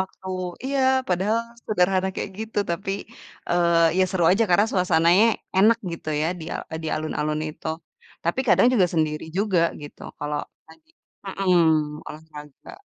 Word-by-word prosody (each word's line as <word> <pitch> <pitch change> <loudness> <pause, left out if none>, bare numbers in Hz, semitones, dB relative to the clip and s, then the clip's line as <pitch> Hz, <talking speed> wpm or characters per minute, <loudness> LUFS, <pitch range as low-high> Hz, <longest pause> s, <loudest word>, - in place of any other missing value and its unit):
waktu. 190 0 -6 0.4
Iya, 275 +1 -1 0.3
padahal 190 +5 +1 0.3
sederhana 190 -1 +2
kayak - - -4
gitu. 220 -1 -4
Tapi, 195 +3 -2 0.6
eee, 170 -1 +3
ya - - +5
seru 185 -3 0
aja 220 +4 +3
karena 200 +4 +5
suasananya 180 +1 +4 0.3
enak 220 +4 +5 0.2
gitu 165 - -7
ya 160 - +1
di - - -7
al - - -4
eee, 160 - -3
di - - -2
alun-alun 155 0 -2
itu. 155 - -10 0.6
Tapi 170 +10 0
kadang - - +5
juga 200 -8 +4
sendiri 155 -2 0
juga 200 -4 +2 0.2
gitu, 145 - -11 0.2
kalau 145 0 -3 0.3
lagi 310 - -19 0.4
mhm, 160 -6 +2
olahraga. 150 -2 -12
175 Hz, 150 wpm, -24 LUFS, 155-195 Hz, 0.6 s, ya